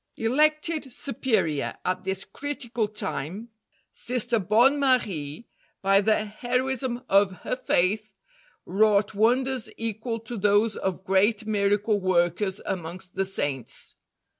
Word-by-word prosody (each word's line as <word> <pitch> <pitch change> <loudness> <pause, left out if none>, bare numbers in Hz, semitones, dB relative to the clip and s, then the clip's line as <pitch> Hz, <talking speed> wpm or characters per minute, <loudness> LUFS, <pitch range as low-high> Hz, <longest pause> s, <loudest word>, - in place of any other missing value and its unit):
Elected 305 +4 +1
Superior 220 - -1
at 185 - -1
this 190 0 -1
critical 245 -6 -3
time, 205 0 -4 0.4
Sister 240 -1 0
Bonne 235 +9 +4
Marie, 215 - 0 0.4
by 195 +1 +5
the 215 +1 +2
heroism 250 +3 -2
of 195 0 +4
her - - -1
faith, 210 -2 0 0.5
wrought 210 +1 +3
wonders 250 +4 +1
equal 225 +1 -3
to 230 +1 -7
those 205 +2 +3
of 190 -1 -3
great 205 +3 +2
miracle 205 0 +1
workers 185 +1 +1
amongst 180 +1 -5
the 195 - 0
Saints. 145 -9 -3
215 Hz, 115 wpm, -26 LUFS, 190-240 Hz, 0.5 s, by